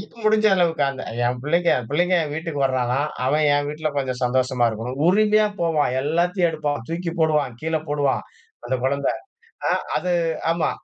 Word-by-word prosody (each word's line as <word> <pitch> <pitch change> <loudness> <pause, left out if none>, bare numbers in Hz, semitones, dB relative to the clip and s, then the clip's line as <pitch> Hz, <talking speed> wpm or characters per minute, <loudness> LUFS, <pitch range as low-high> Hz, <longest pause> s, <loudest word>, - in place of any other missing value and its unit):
எனக்கு 210 - -12
முடிஞ்ச 215 0 +4
அளவுக்கு 170 -4 +1
அந்த 135 -1 -7 0.2
என் 125 +1 -1
பிள்ளைங்க, 170 +3 +2 0.2
பிள்ளைங்க 175 +5 +2
என் 145 - -6
வீட்டுக்கு 160 -2 -4
வர்றானா! 130 0 0 0.3
அவன் 150 +3 +2
என் 145 0 0
வீட்ல 155 +1 -2
கொஞ்சம் 130 -2 -3
சந்தோஷமா 125 0 +1
இருக்கணும். 115 +4 -5
உரிமையா 215 +2 +4
போவான், 160 -6 +1
எல்லாத்தையும் 175 +4 +1
எடுப்பான், 145 -5 -3
தூக்கி 170 0 -3
போடுவான், 150 -6 +1
கீழே 160 0 -1
போடுவான் 145 -2 +1 0.4
அந்த 130 - -1
குழந்த. 140 +1 0 0.6
அ - - +3 0.2
அது 180 - -1 0.4
ஆமா 165 -1 0
150 Hz, 160 wpm, -22 LUFS, 135-170 Hz, 0.6 s, முடிஞ்ச